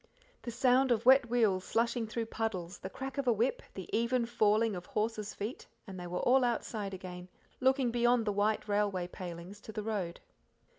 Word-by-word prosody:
The - - -6
sound 255 +2 +3
of 230 0 +1
wet 260 -2 +6
wheels 215 -6 +2
slushing 235 +1 0
through 230 +1 -3
puddles, 200 -6 -3
the 190 - -6
crack 270 +6 -6
of 275 - -2
a - - +6
whip, 235 - +1
the - - -6
even 235 +2 +1
falling 220 -2 +2
of 180 0 -7
horses' 215 -1 -2
feet, 215 +6 -5 0.2
and 190 -4 -8
they 175 - -6
were 180 +1 -3
all 260 +1 +4
outside 215 -4 -2
again, 180 -1 -8 0.3
looking 260 -1 +3
beyond 240 -1 +3
the 210 - 0
white 210 +2 +1
railway 205 -3 0
palings 180 +2 -8
to 220 - -9
the 215 0 -4
road. 200 -6 -3
220 Hz, 190 wpm, -32 LUFS, 195-240 Hz, 0.3 s, wet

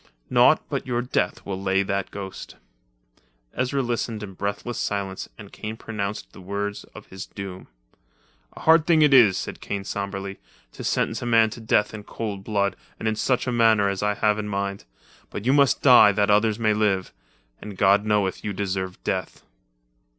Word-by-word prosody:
Naught - - +5
but - - -4
your 120 -1 -1
death 125 - -1
will 95 -1 -4
lay 95 0 +1
that 100 0 -2
ghost." 95 -2 -8 1.0
Ezra 130 +2 -1
listened 115 -2 -3
in 95 -2 -8
breathless 100 +5 -4
silence 100 -2 -3
and 100 -2 -12
Kane 110 +1 -6
pronounced 105 -2 -5
the - - -12
words 100 +2 -4
of - - -10
his 95 0 -8
doom. 95 -2 -8 0.9
"A - - -12
hard 160 0 +5
thing 160 -3 +5
it 145 -2 +5
is," 110 -8 +7
said - - -6
Kane 100 -1 -4
sombrely, 100 0 -5 0.3
"to - - -9
sentence 110 +2 0
a 120 - -4
man 115 -2 +4
to 120 - -8
death 105 -1 +1
in 110 - -6
cold 105 -2 -5
blood 100 -2 0 0.2
and 110 - -4
in 110 - +1
such 125 +3 0
a 125 - -1
manner 110 -4 +4
as 100 -1 -3
I 105 0 +1
have 105 0 +1
in 105 - -4
mind, 100 -1 -3 0.4
but 100 - -7
you 130 - +4
must 140 -2 +3
die 125 -6 +8
that 105 0 +2
others 105 +1 +3
may 110 -2 +2
live—and 95 - -4
God 100 +2 +4
knoweth 105 -3 0
you 105 - -3
deserve 95 -1 -3
death. 95 -1 -3
105 Hz, 180 wpm, -24 LUFS, 100-115 Hz, 1.0 s, die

